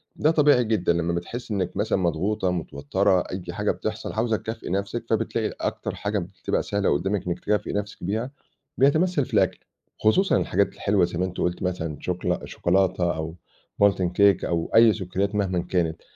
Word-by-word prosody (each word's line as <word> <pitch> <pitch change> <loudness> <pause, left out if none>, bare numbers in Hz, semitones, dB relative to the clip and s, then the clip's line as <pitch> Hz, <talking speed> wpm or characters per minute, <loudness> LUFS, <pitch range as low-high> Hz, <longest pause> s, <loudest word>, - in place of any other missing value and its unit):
ده 155 - +3
طبيعي 145 -5 +4
جدًا 110 -6 +1
لمّا 85 0 0
بتحسّي 110 +7 -4
إنِّك 95 -3 -2
مثلًا 105 0 +1
مضغوطة، 95 +3 0
متوترة، 90 +4 +1
أي 90 +1 -5
حاجة 105 +2 0
بتحصل، 110 0 -4
عاوزة 110 0 +1
تكافئي 110 0 -6
نفسِك، 100 +5 -2
فبتلاقي 110 0 0
أكتر - - -3
حاجة 105 0 -2
بتبقى 95 +2 -3
سهلة 100 -5 +1
قدّامِك 95 +5 -1
إنِّك 90 0 -2
تكافئي 105 +1 -1
نفسِك 105 -1 -4
بيها، 110 +8 -2 0.5
بيتمثّل 150 +2 +3
في - - -15
الأكل، - - +2 0.4
خصوصًا 190 - +3
الحاجات 100 +2 +1
الحلوة، 100 -3 +2
زي 85 -1 -5
ما 90 - +2
أنتِ 95 -1 -6
قُلتِ 90 0 -1
مثلًا، 80 -5 -2
شوكلا 90 0 -2
شوكولاتة 90 -1 +1
أو 80 +1 -5 0.5
molten 95 -3 +3
cake 100 -2 +5
أو 85 -1 -1
أي 115 -1 +7
سكريات 100 +1 -2
مهمًا 95 -3 0
كانت، 85 -3 -1
100 Hz, 170 wpm, -25 LUFS, 90-110 Hz, 0.5 s, أي